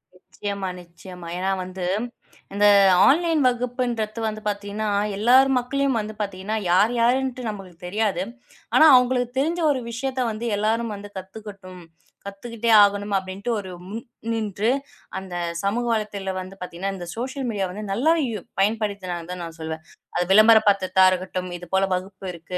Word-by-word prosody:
நிச்சயமா. 200 Hz, +1 st, -5 dB
நிச்சயமா. 175 Hz, 0 st, -12 dB
ஏன்னா 190 Hz, +1 st, 0 dB
வந்து 185 Hz, 0 st, -6 dB, 0.7 s
இந்த 205 Hz, +1 st, +2 dB, 0.4 s
ஆன்லைன் 330 Hz, +1 st, +3 dB
வகுப்புன்றது 245 Hz, -3 st, -2 dB
வந்து 215 Hz, 0 st, -4 dB
பாத்தீங்கன்னா 205 Hz, +1 st, -3 dB, 0.3 s
எல்லாரும் 255 Hz, +5 st, +5 dB
மக்களையும் 270 Hz, 0 st, 0 dB
வந்து 215 Hz, 0 st, -5 dB
பாத்தீங்கன்னா 200 Hz, +2 st, -3 dB
யார் 200 Hz, +6 st, +4 dB
யாருன்ட்டு 255 Hz, 0 st, +1 dB
நம்மளுக்குத் 185 Hz, -4 st, -9 dB
தெரியாது. 200 Hz, -2 st, 0 dB, 0.5 s
ஆனா -, -, +8 dB
அவங்களுக்கு 250 Hz, 0 st, +2 dB
தெரிஞ்ச 330 Hz, +5 st, 0 dB
ஒரு 270 Hz, -, 0 dB
விஷயத்த 260 Hz, +2 st, -3 dB
வந்து 220 Hz, +2 st, -5 dB
எல்லாரும் 220 Hz, +2 st, 0 dB
வந்து 205 Hz, +1 st, -9 dB
கத்துக்கட்டும். 190 Hz, -2 st, -11 dB, 0.4 s
கத்துக்கிட்டே 230 Hz, +3 st, -3 dB
ஆகணும் 205 Hz, 0 st, 0 dB
அப்டின்டு 190 Hz, +4 st, -5 dB
ஒரு 190 Hz, -2 st, -8 dB, 0.2 s
முன் 220 Hz, +3 st, -5 dB, 0.3 s
நின்று 215 Hz, -1 st, -1 dB, 0.5 s
அந்தச் 175 Hz, -3 st, -4 dB
சமூக 225 Hz, +5 st, 0 dB
வலைத்தளத்தில 210 Hz, -3 st, -2 dB
வந்து 185 Hz, +1 st, -8 dB
பாத்தீங்கன்னா 180 Hz, +2 st, -4 dB
இந்த 180 Hz, -2 st, -7 dB
சோசியல் 260 Hz, +3 st, -4 dB
மீடியா 200 Hz, -4 st, -1 dB
வந்து 210 Hz, +3 st, -7 dB
நல்லா 265 Hz, +11 st, +3 dB, 0.2 s
யு 215 Hz, -3 st, -4 dB, 0.2 s
பயன்படுத்தினா 200 Hz, -3 st, 0 dB
தான் 180 Hz, 0 st, -5 dB
நான் 165 Hz, -1 st, -8 dB
சொல்லுவேன். 160 Hz, 0 st, -5 dB, 0.3 s
அது 175 Hz, -, +1 dB
விளம்பரபடுத்தரதா 200 Hz, -3 st, +5 dB
இருக்கட்டும். 185 Hz, 0 st, -3 dB
இது 175 Hz, -, -10 dB
போல 190 Hz, 0 st, +4 dB
வகுப்பு 190 Hz, +1 st, -5 dB
இருக்கு 175 Hz, +1 st, -6 dB
205 Hz, 145 wpm, -23 LUFS, 185-235 Hz, 0.7 s, ஆனா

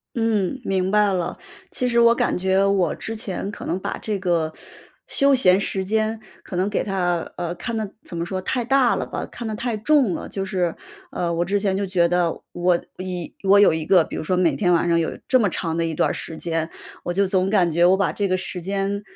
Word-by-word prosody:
嗯， 225 Hz, 0 st, 0 dB
明 190 Hz, -1 st, 0 dB
白 210 Hz, -1 st, +3 dB
了。 180 Hz, -2 st, -2 dB, 0.3 s
其 250 Hz, -, -1 dB
实 235 Hz, -1 st, +3 dB
我 235 Hz, 0 st, +6 dB
感 -, -, 0 dB
觉 190 Hz, +1 st, +2 dB
我 195 Hz, -5 st, +2 dB
之 225 Hz, -, -6 dB
前 200 Hz, -2 st, -3 dB
可 -, -, -8 dB
能 175 Hz, -, -1 dB
把 -, -, -4 dB
这 210 Hz, -2 st, -3 dB
个 170 Hz, -4 st, 0 dB, 0.5 s
休 275 Hz, 0 st, +3 dB
闲 190 Hz, -6 st, +5 dB
时 190 Hz, -1 st, -2 dB
间 220 Hz, +2 st, 0 dB, 0.2 s
可 180 Hz, -, -7 dB
能 185 Hz, +2 st, +1 dB
给 205 Hz, -, 0 dB
它， 175 Hz, -4 st, -1 dB
呃， 175 Hz, 0 st, -3 dB
看 230 Hz, +5 st, -4 dB
得 215 Hz, -2 st, -3 dB
怎 170 Hz, -, -9 dB
么 170 Hz, -, -1 dB
说， 185 Hz, +1 st, -3 dB
太 240 Hz, +6 st, -2 dB
大 265 Hz, 0 st, +3 dB
了 -, -, -3 dB
吧， -, -, -5 dB
看 235 Hz, -, -8 dB
得 220 Hz, -, -3 dB
太 235 Hz, +1 st, -2 dB
重 255 Hz, -2 st, +3 dB
了。 -, -, -5 dB
就 195 Hz, -1 st, -4 dB
是， 180 Hz, -4 st, -1 dB, 0.4 s
呃， 170 Hz, -1 st, -2 dB
我 170 Hz, +1 st, 0 dB
之 200 Hz, +2 st, 0 dB
前 195 Hz, -2 st, 0 dB
就 200 Hz, 0 st, -1 dB
觉 175 Hz, -2 st, +2 dB
得 175 Hz, -1 st, 0 dB
我 175 Hz, 0 st, +2 dB, 0.2 s
一 180 Hz, -2 st, -5 dB
我 200 Hz, +1 st, +6 dB
有 205 Hz, -, +6 dB
一 160 Hz, -1 st, -2 dB
个， 180 Hz, 0 st, +5 dB
比 -, -, -7 dB
如 -, -, -3 dB
说 180 Hz, +3 st, 0 dB
每 180 Hz, -2 st, +2 dB
天 180 Hz, -3 st, +2 dB
晚 170 Hz, 0 st, +2 dB
上 170 Hz, 0 st, +3 dB
有 165 Hz, -, -1 dB
这 255 Hz, -, +5 dB
么 210 Hz, -5 st, +2 dB
长 165 Hz, -1 st, -2 dB
的 165 Hz, -, 0 dB
一 165 Hz, -1 st, -2 dB
段 -, -, +2 dB
儿 -, -, +1 dB
时 160 Hz, -, -6 dB
间， 165 Hz, -1 st, -1 dB, 0.4 s
我 175 Hz, -, -2 dB
就 195 Hz, +2 st, +2 dB
总 185 Hz, 0 st, +1 dB
感 180 Hz, -5 st, +3 dB
觉 170 Hz, +2 st, +3 dB
我 185 Hz, +2 st, +5 dB
把 200 Hz, -, +1 dB
这 205 Hz, -, -1 dB
个 185 Hz, -, +2 dB
时 185 Hz, -1 st, -4 dB
间， 195 Hz, +2 st, -2 dB
190 Hz, 260 characters per minute, -22 LUFS, 175-210 Hz, 0.5 s, 我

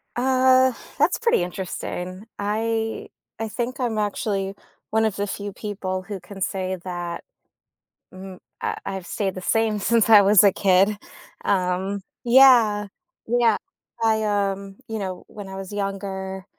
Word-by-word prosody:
Uh, 260 Hz, +1 st, +4 dB, 0.3 s
that's 310 Hz, +5 st, +3 dB
pretty 465 Hz, -, +2 dB
interesting. 185 Hz, +1 st, -5 dB
I 225 Hz, +2 st, -2 dB, 0.3 s
I 225 Hz, -, -2 dB
think 245 Hz, +5 st, -4 dB
I'm 235 Hz, -4 st, -1 dB
actually 200 Hz, -1 st, -1 dB, 0.4 s
1 220 Hz, 0 st, +3 dB
of 215 Hz, -, 0 dB
the 205 Hz, -, -1 dB
few 205 Hz, 0 st, -5 dB
people 190 Hz, -3 st, -4 dB
who 200 Hz, -2 st, -6 dB
can 195 Hz, +3 st, -11 dB
say 190 Hz, 0 st, -2 dB
that 175 Hz, -2 st, -5 dB, 0.9 s
mhm, 185 Hz, 0 st, -10 dB, 0.2 s
I -, -, -2 dB
I've 190 Hz, -2 st, -5 dB
stayed 195 Hz, -3 st, -2 dB
the 185 Hz, -, -4 dB
same 220 Hz, +2 st, +1 dB
since 225 Hz, +1 st, +2 dB
I 210 Hz, -, +10 dB
was 200 Hz, 0 st, +6 dB
a 200 Hz, -, +6 dB
kid, 195 Hz, +2 st, +3 dB, 0.5 s
um 190 Hz, +1 st, 0 dB, 0.2 s
Yeah. 235 Hz, -5 st, +6 dB, 0.4 s
Yeah. 235 Hz, -1 st, +3 dB, 0.5 s
I, 220 Hz, -1 st, +3 dB
um 200 Hz, -1 st, -1 dB
you 220 Hz, -, -3 dB
know, 185 Hz, -3 st, -5 dB
when 205 Hz, -2 st, -9 dB
I 190 Hz, -, -7 dB
was 195 Hz, +1 st, -7 dB
younger, 195 Hz, -1 st, -4 dB
205 Hz, 145 wpm, -23 LUFS, 190-225 Hz, 0.9 s, I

